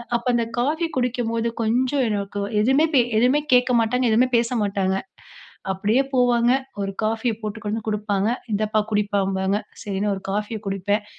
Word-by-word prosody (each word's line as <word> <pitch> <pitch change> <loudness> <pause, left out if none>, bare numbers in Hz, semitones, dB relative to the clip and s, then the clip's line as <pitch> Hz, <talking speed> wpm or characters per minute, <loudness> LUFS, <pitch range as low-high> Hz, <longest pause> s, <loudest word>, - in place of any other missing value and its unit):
அப்போ 235 +1 -2
அந்த 235 - +2 0.2
காஃபி 315 +6 0
குடிக்கும்போது 235 -2 -1
கொஞ்சம் 255 +4 +1
எனக்கு 200 -1 -3 0.2
எதுவுமே 270 +7 +4
பே 250 - +7 0.2
எதுவுமே 255 +5 +4
கேட்க 250 0 +4
மாட்டாங்க, 250 +3 +1
எதுவுமே 245 +4 +4
பேச 230 0 +1
மாட்டாங்க. 195 -2 0 0.8
அப்டியே 210 +7 +1
போவாங்க. 245 -1 +3 0.3
ஒரு 195 0 -3
காஃபிய 225 +2 0
போட்டு 215 0 -4
கொண்டு 210 +1 -1
வந்து - - -20
கு 215 - +1
டுப்பாங்க. 205 0 -1 0.3
இந்தப்பா 215 +1 +1
குடிப்பாம்பாங்க. 200 -1 0 0.3
சரினு 205 0 -1
ஒரு 190 - -8
காஃபிய 210 +2 -2
குடிப்பேன். 200 +2 -1
220 Hz, 155 wpm, -23 LUFS, 205-245 Hz, 0.8 s, பே